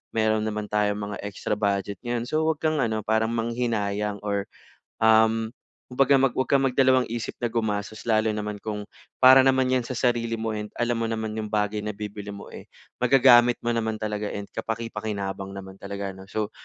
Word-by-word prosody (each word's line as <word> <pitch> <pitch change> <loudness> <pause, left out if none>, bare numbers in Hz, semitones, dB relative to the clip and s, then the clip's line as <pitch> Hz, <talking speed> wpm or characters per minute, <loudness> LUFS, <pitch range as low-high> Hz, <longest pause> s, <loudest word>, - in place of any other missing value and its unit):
meron 110 -1 +2
naman 105 -1 -3
tayong 105 -1 +1
mga 105 0 -4
extra 100 +1 -3
budget 100 -2 -1
ngayon 120 -1 -2
so, 155 +4 0
'wag 160 -2 0
kang 155 -1 +1
ano, 110 -1 0
parang 110 +1 +2
manghinayang 110 -3 -1
or, 100 -1 -2 0.6
um, 110 0 +4 0.4
kumbaga 135 +2 +3
mag 135 - +4
huwag 130 - +2
kang 135 +1 +3
mag 135 - +2
dalawang 130 -1 +5
isip 115 -1 -4
na 120 - 0
gumasos 110 -2 -3
lalo 110 -1 +2
naman 105 -1 -4
kung 105 -1 -4 0.3
para 130 +1 +8
naman 130 0 +3
'yan 125 - +2
sa 120 0 -5
sarili 115 -2 0
mo 110 0 -2
and 105 0 -5
alam 120 0 +1
mo 115 - -1
naman 110 -1 -3
yung 110 -1 -4
bagay 105 0 0
na 105 - -3
bibilhin 105 0 -6
mo, 100 - -10
eh, - - -11 0.3
magagamit 125 -1 +6
mo 120 0 0
naman 110 -1 -1
talaga 105 -1 -3
and 100 0 -5
kapaki-pakinabang 105 -4 -4
naman 95 -1 -9
talaga 100 -1 -5
ano. 95 - -12
So, 110 -1 -2
110 Hz, 190 wpm, -25 LUFS, 105-120 Hz, 0.6 s, para